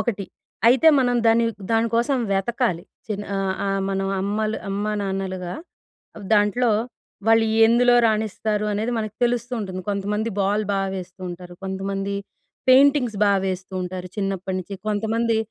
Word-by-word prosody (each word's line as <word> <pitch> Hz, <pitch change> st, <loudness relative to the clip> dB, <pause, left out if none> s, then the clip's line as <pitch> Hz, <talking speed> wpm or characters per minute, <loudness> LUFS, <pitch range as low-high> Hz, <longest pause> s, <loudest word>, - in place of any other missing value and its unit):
ఒకటి 205 Hz, -5 st, -2 dB, 0.4 s
అయితే 265 Hz, +6 st, +6 dB
మనం 245 Hz, -2 st, +2 dB
దాన్ని 230 Hz, +1 st, +4 dB, 0.3 s
దానికోసం 230 Hz, +4 st, +2 dB
వెతకాలి. 195 Hz, -2 st, 0 dB, 0.3 s
చిన్న 205 Hz, -1 st, -3 dB
ఆ! -, -, 0 dB, 0.3 s
ఆ! -, -, 0 dB, 0.2 s
మన 195 Hz, 0 st, -1 dB, 0.2 s
అమ్మలు 215 Hz, +2 st, -1 dB
అమ్మా 205 Hz, +2 st, -1 dB
నాన్నలుగా 190 Hz, -2 st, -3 dB, 0.8 s
దాంట్లో 215 Hz, +3 st, +3 dB, 0.6 s
వాళ్ళు 225 Hz, 0 st, +5 dB, 0.2 s
ఎందులో 245 Hz, +1 st, +4 dB
రాణిస్తారు 215 Hz, -1 st, -1 dB
అనేది 220 Hz, +4 st, -1 dB
మనకు 215 Hz, -1 st, -4 dB
తెలుస్తూ 240 Hz, 0 st, -1 dB
ఉంటుంది. 185 Hz, -2 st, -5 dB
కొంతమంది 205 Hz, +2 st, -1 dB
బాల్ 205 Hz, +2 st, +1 dB
బా 195 Hz, -, +1 dB
వేస్తూ 185 Hz, 0 st, -8 dB
ఉంటారు, 175 Hz, 0 st, -9 dB
కొంతమంది 195 Hz, +1 st, -3 dB, 0.5 s
పెయింటింగ్స్ 260 Hz, -4 st, +5 dB
బా 200 Hz, -, +4 dB
వేస్తూ 185 Hz, 0 st, -4 dB
ఉంటారు. 180 Hz, 0 st, -5 dB
చిన్నప్పటినుంచి, 195 Hz, -1 st, -3 dB
కొంతమంది 225 Hz, +2 st, 0 dB
210 Hz, 130 wpm, -23 LUFS, 195-230 Hz, 0.8 s, అయితే